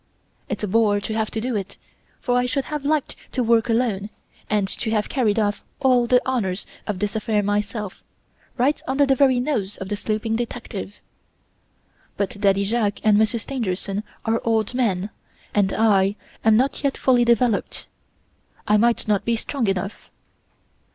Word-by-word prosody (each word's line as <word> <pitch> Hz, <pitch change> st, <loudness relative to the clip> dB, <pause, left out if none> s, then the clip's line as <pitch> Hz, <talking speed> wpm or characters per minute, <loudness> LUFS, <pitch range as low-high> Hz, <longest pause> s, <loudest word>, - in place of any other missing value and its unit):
It's -, -, -3 dB
a -, -, 0 dB
bore 210 Hz, 0 st, +3 dB
to 215 Hz, +2 st, -4 dB
have 220 Hz, -1 st, 0 dB
to 220 Hz, -, -3 dB
do 245 Hz, +1 st, -2 dB
it, 195 Hz, -2 st, -4 dB, 0.4 s
for 245 Hz, -, 0 dB
I 250 Hz, 0 st, +2 dB
should 270 Hz, +1 st, -1 dB
have 300 Hz, -2 st, -4 dB
liked 300 Hz, 0 st, 0 dB, 0.2 s
to 255 Hz, -, +1 dB
work 230 Hz, 0 st, +3 dB
alone 225 Hz, -4 st, 0 dB, 0.4 s
and 210 Hz, -2 st, +1 dB
to 220 Hz, -, -4 dB
have 215 Hz, -1 st, 0 dB
carried 230 Hz, -7 st, +1 dB
off 205 Hz, -2 st, 0 dB, 0.2 s
all 250 Hz, -3 st, +3 dB
the 250 Hz, +1 st, +5 dB
honors 210 Hz, -7 st, -1 dB, 0.2 s
of 210 Hz, -3 st, -2 dB
this 205 Hz, +3 st, -2 dB
affair 215 Hz, -1 st, 0 dB
myself, 205 Hz, 0 st, -2 dB, 0.6 s
right 270 Hz, +4 st, +2 dB
under 270 Hz, +2 st, +3 dB
the 270 Hz, -, +3 dB
very 265 Hz, -2 st, +4 dB
nose 225 Hz, -7 st, -1 dB
of 190 Hz, -, -6 dB
the 205 Hz, -, -1 dB
sleeping 215 Hz, +2 st, -2 dB
detective. 225 Hz, -4 st, -5 dB, 1.2 s
But 200 Hz, 0 st, -3 dB
Daddy 195 Hz, 0 st, +3 dB
Jacques 215 Hz, -1 st, 0 dB
and 215 Hz, -1 st, +5 dB
Monsieur 220 Hz, +1 st, +2 dB
Stangerson 205 Hz, -5 st, -3 dB, 0.2 s
are 225 Hz, +1 st, +1 dB
old 225 Hz, -1 st, +1 dB
men, 210 Hz, -6 st, 0 dB, 0.4 s
and 200 Hz, -2 st, +2 dB
I 200 Hz, -3 st, +3 dB, 0.3 s
am 220 Hz, -1 st, +5 dB
not 275 Hz, +4 st, 0 dB
yet 280 Hz, -1 st, 0 dB
fully 250 Hz, -2 st, +4 dB
developed. 235 Hz, -2 st, +1 dB, 0.8 s
I 210 Hz, 0 st, +5 dB
might 235 Hz, +1 st, +2 dB
not 205 Hz, -2 st, +2 dB
be 235 Hz, -, +1 dB
strong 235 Hz, +1 st, -2 dB
enough. 195 Hz, +1 st, -3 dB
220 Hz, 170 wpm, -23 LUFS, 205-245 Hz, 1.2 s, the